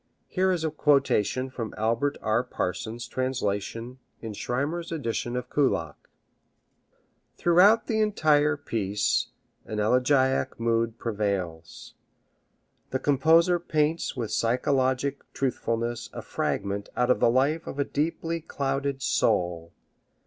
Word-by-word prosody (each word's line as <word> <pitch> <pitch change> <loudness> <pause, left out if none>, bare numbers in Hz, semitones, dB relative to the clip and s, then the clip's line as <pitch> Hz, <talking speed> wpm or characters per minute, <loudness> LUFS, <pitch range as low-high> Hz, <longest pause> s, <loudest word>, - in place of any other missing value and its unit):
Here 190 0 +1
is 175 -3 -1
a 160 - 0
quotation 135 -4 +2
from 115 -4 -5
Albert 115 +6 0
R. 110 +2 +2
Parsons' 115 +1 -4
translation 120 -1 -3 0.2
in 110 -2 -6
Schirmer's 145 +11 -3
edition 120 -5 -2
of 125 0 -3
Kullak. 85 - -1 1.3
Throughout 190 +6 +5
the 220 -1 0
entire 155 -8 +3
piece 105 -7 0 0.4
an 110 - -4
elegiac 130 +5 +2
mood 115 0 0
prevails. 100 -8 -3 1.0
The 130 - 0
composer 160 +6 +4
paints 155 -1 0
with 115 -4 -3
psychologic 130 +3 +1
truthfulness 120 -3 -2
a - - -6
fragment 100 +1 -2
out 125 0 +3
of - - +2
the - - +4
life 140 +7 +1
of - - -6
a 140 - +1
deeply 165 +2 -2
clouded 135 -2 -2
soul. 85 -9 +1
130 Hz, 115 wpm, -27 LUFS, 115-150 Hz, 1.3 s, Throughout